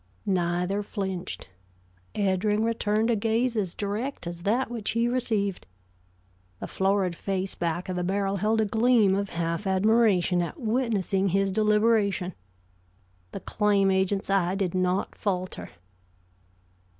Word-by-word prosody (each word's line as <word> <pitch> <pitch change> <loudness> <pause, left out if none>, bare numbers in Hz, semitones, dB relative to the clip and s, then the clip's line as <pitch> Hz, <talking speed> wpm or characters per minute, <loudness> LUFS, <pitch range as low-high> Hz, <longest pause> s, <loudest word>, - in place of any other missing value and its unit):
Neither 180 +1 0
flinched. 190 - -5 0.6
Eddring 205 +2 +1
returned 225 0 +1
a - - +3
gaze 230 +3 0
as 190 -5 -2
direct 215 +6 -3
as 170 0 -5
that 230 +7 0
which 225 -4 -3
he 230 +1 +2
received. 220 -6 -1 0.9
The - - -5
florid 190 -2 0
face 190 +1 -3
back 170 +1 -2
of 185 - -3
the 180 - -1
barrel 195 +2 0
held 220 +3 +1
a - - +2
gleam 220 -1 +3
of 200 0 -1
half 170 +3 -2
admiration 190 -2 +3
at 175 - -5
witnessing 215 -5 0
his 195 +1 +1
deliberation. 210 -3 +2 1.0
The - - -6
claim 200 -2 +2
agent's 190 +1 0
eye 190 -1 +2
did 195 -3 -1
not 185 +1 0
falter. 185 - -3
200 Hz, 130 wpm, -26 LUFS, 185-220 Hz, 1.0 s, a